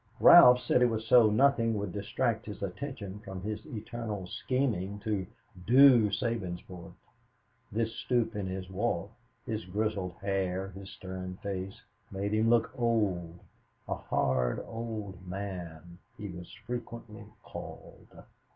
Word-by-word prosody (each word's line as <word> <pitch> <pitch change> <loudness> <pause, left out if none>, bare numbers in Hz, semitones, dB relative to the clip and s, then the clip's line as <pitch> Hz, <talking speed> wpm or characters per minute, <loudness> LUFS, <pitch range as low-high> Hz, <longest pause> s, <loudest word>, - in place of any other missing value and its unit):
Ralph 125 0 +9
said 125 - +2
it 125 - +6
was 110 -1 -3
so 115 -1 +7
nothing 115 -1 +3
would 100 -2 -3
distract 110 +4 -1
his 105 -1 -6
attention 100 -1 -5
from 95 -3 -8
his 105 0 -4
eternal 110 -3 -5
scheming 105 -3 -1
to 105 -4 -2 0.4
"do" 125 -3 +7
Sabinsport. 95 -6 -4 0.8
This 115 +1 -1
stoop 120 -2 0
in 100 -2 -2
his 95 0 -5
walk, 95 -1 -2 0.3
his 110 -3 -3
grizzled 100 -1 -2
hair, 95 -1 -2
his 95 0 -10
stern 95 -1 -7
face, 95 -1 -4 0.3
made 100 +2 -3
him 110 +1 +3
look 115 -1 +3
old 100 -8 0 0.5
a - - -1
"hard 65 -2 0
old 105 -5 -6
man" 90 -3 -6 0.2
he 105 -2 -6
was 90 -1 -9
frequently 115 -2 -6 0.2
called. - - -10
105 Hz, 130 wpm, -30 LUFS, 95-115 Hz, 0.8 s, Ralph